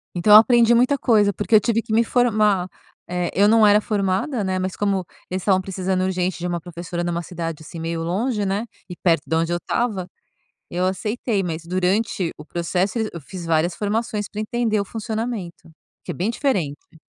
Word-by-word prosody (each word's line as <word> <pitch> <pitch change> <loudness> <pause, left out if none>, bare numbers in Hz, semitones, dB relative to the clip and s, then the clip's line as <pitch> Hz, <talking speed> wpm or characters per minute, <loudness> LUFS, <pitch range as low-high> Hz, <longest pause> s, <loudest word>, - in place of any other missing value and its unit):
Então, 195 +4 +4
eu - - +13
aprendi 235 0 +5
muita 250 +4 +3
coisa, 210 -5 +3
porque 225 - +1
eu - - +9
tive 230 +2 0
que 220 - -5
me 230 +1 +4
formar, 215 -6 +2 0.4
eh, 180 -1 -1
eu 200 +2 +4
não 220 0 +5
era 205 0 +6
formada, 205 +4 -1
né, 185 -1 -1
mas 185 0 -3
como 195 -3 0 0.2
eles 185 +1 -3
estavam 190 -2 +3
precisando 185 0 -2
urgente 185 -1 -1
de 175 - -3
uma 175 -1 -2
professora, 175 0 -5
numa 175 0 -2
cidade, 165 -2 -6
assim, 165 +2 -9
meio 165 0 -3
longe, 205 +5 -1
né, 200 +4 -1 0.2
e 180 - -6
perto 170 -2 +1
da 160 - +1
onde 165 +1 -1
eu 175 - +1
estava, 195 -1 -2 0.6
eu 180 +1 0
aceitei. 210 +3 -1
Mas 165 -2 -4
durante 185 +1 0
o 150 - -10
processo 180 +6 -1
e - - +1
o 220 - -2
eu 170 - -6
fiz 175 +4 -9
várias 165 +1 +1
formações 210 0 -2
pra 210 - -5
entender 220 -1 0
o - - -1
funcionamento, 220 -5 -5 0.3
que - - -4
é - - -8
bem 190 +6 -1
diferente. 180 - -2
190 Hz, 205 wpm, -22 LUFS, 175-215 Hz, 0.6 s, eu